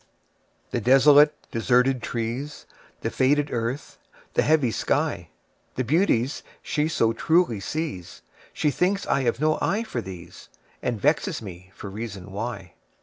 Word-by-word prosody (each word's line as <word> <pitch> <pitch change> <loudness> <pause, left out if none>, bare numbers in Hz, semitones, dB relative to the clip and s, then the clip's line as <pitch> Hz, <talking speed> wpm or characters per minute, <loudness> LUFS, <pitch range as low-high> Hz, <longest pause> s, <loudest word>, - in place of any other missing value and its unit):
The 120 - -1
desolate, 145 +5 +6 0.2
deserted 125 +2 +2
trees, 120 +6 -4 0.4
The - - -2
faded 145 +2 +2
earth, 120 +4 -3 0.3
the - - +3
heavy 150 -6 +3
sky, - - -1 0.5
The 130 - 0
beauties 135 - +1 0.2
she 150 0 0
so 115 -8 +1
truly 160 - +2
sees, 100 - -5 0.3
She 150 - 0
thinks 190 +7 0
I 135 - +1
have 120 -1 0
no 155 +1 +2
eye 215 +3 +1
for 225 - -4
these, 90 -2 -11 0.3
And 120 -3 -2
vexes 150 - +1
me 95 -2 -10
for - - -8
reason 100 -2 -7
why. 100 -4 -5
125 Hz, 140 wpm, -25 LUFS, 115-150 Hz, 0.5 s, desolate